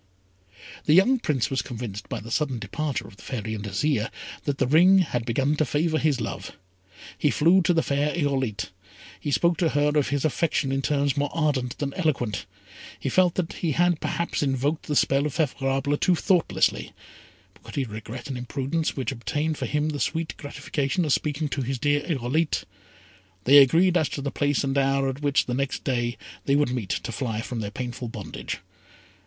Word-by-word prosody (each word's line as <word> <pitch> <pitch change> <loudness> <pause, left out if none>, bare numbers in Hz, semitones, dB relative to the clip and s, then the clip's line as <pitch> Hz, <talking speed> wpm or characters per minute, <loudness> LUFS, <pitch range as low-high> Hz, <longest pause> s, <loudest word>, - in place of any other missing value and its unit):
The 155 - +5
young 245 +8 +5
Prince 135 - 0
was 135 - +1
convinced 110 -5 -6
by - - -3
the 115 +3 -9
sudden 135 -2 0
departure 140 +7 -3
of 100 - -15
the - - -14
Fairy 110 -4 -4
and 105 -2 -5
Azire, 105 +3 0 0.4
that 145 -2 -1
the 135 - +2
ring 175 +8 +6
had 125 -10 0
begun 135 +5 +1
to 155 - +3
favour 155 +3 +1
his 150 -4 +1
love. 100 -4 -5 0.7
He - - +3
flew 175 +5 +4
to 175 - +2
the 165 -2 +2
fair 145 +1 +1
Irolite. 135 -9 -1 0.5
He 120 - -4
spoke 170 +4 +2
to 170 -3 +3
her 145 0 +2
of 145 -2 +3
his 145 +1 0
affection 155 -1 +1
in 135 0 0
terms 140 -1 +1
more 145 0 0
ardent 145 -6 0
than 140 -1 -3
eloquent. 140 - -1 0.5
He - - -2
felt 180 -2 +3
that 175 -3 -2
he 160 -4 -1
had 175 +1 +2
perhaps 170 0 -1
invoked 140 +2 0
the 150 - -1
spell 140 +1 +3
of 145 - -6
Favourable 135 -2 0
too 180 - +3
thoughtlessly; 180 0 +1 0.6
but - - -23
could - - -11
he 140 - +1
regret 110 +2 -7
an 135 -2 -4
imprudence 135 +6 -2
which 135 +1 -1
obtained 145 +6 -2
for - - -2
him 150 +1 0
the 145 -2 -3
sweet 165 +2 -1
gratification 145 +3 -2
of 150 - +2
speaking 150 0 0
to 140 - -2
his 130 +1 -2
dear 145 +3 +2
Irolite? 150 +1 0 0.8
They 140 +5 +8
agreed 170 +7 +5
as 155 -4 +1
to 140 - -4
the 140 - -2
place 145 -1 +1
and 135 0 -1
hour 135 0 +2
at 135 +2 -6
which, 145 -1 +2
the 125 - -3
next 135 +1 -2
day, 120 -2 -1 0.3
they 140 - +3
would 145 -3 +2
meet, 120 -7 -3
to - - -2
fly 115 -3 -2
from 120 0 -5
their 105 -2 -3
painful 125 +2 -5
bondage. 115 - -6
140 Hz, 195 wpm, -25 LUFS, 125-155 Hz, 0.8 s, They